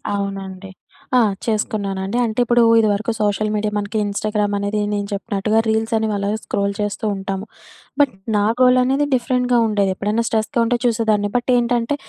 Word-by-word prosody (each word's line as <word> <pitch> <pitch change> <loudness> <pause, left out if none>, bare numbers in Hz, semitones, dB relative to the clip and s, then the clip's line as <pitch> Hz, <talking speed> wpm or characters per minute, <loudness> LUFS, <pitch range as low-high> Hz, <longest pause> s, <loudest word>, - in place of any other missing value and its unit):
అవునండి. 195 -1 -5 0.5
ఆ! - - +6 0.3
చేసుకున్నానండి. 205 -2 -2
అంటే 220 +1 -3
ఇప్పుడు 240 0 +4 0.2
ఇది 220 - +3
వరకు 220 +3 -2
సోషల్ 210 +1 0
మీడియా 210 0 -1
మనకి 205 +1 -3
ఇన్‌స్టాగ్రామ్ 205 0 -1
అనేది 200 +1 -1
నేను 205 -1 -2
చెప్పినట్టుగా 205 +1 0
రీల్సనేవి 220 0 0
అలాగే 200 +2 -1
స్క్రోల్ 200 0 -1
చేస్తూ 205 +1 -3
ఉంటాము. 195 0 -4 0.5
బట్ 285 -2 +3 0.2
నా 205 - +2 0.2
గోలనేది 255 +2 +4
డిఫరెంట్‌గా 250 0 +1
ఉండేది. 205 -2 +1
ఎప్పుడైనా 210 +4 -1
స్ట్రెస్‌గా 225 +4 -1
ఉంటే 240 +1 +1
చూసేదాన్ని. 220 -3 +1
బట్ 245 +1 0
ఏంటంటే, 240 +2 +1
215 Hz, 150 wpm, -20 LUFS, 200-235 Hz, 0.5 s, ఆ